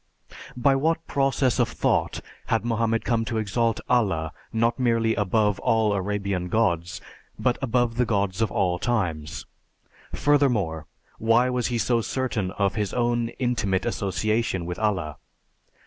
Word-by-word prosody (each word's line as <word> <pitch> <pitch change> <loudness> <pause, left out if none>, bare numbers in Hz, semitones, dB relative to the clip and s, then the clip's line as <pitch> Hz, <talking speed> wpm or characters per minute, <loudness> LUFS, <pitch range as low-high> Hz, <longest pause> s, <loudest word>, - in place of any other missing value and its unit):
By 135 +2 +3
what 160 +4 0
process 135 -2 +1
of - - +2
thought - - 0 0.3
had 115 0 0
Mohammed 115 -1 0
come 115 -2 +1
to 115 -2 -2
exalt 110 +2 0
Allah 95 -11 +1 0.2
not 115 +3 +1
merely 115 -2 +2
above 105 0 +1
all 110 0 +2
Arabian 100 -2 -2
gods, 85 -6 0 0.4
but 125 -2 0
above 120 -2 0
the 125 - +3
gods 100 -2 0
of 110 -5 +1
all 90 0 0
times? 85 -9 -2 0.7
Furthermore, 110 - +1 0.3
why 115 +3 +3
was 125 -2 0
he 120 - -1
so 115 +1 +1
certain 115 -6 -2
of 100 -2 0
his 105 -2 -2
own 120 -1 +1
intimate 110 -7 0
association 105 -1 -1
with 90 0 -5
Allah? 95 -9 -1
110 Hz, 140 wpm, -25 LUFS, 95-120 Hz, 0.7 s, By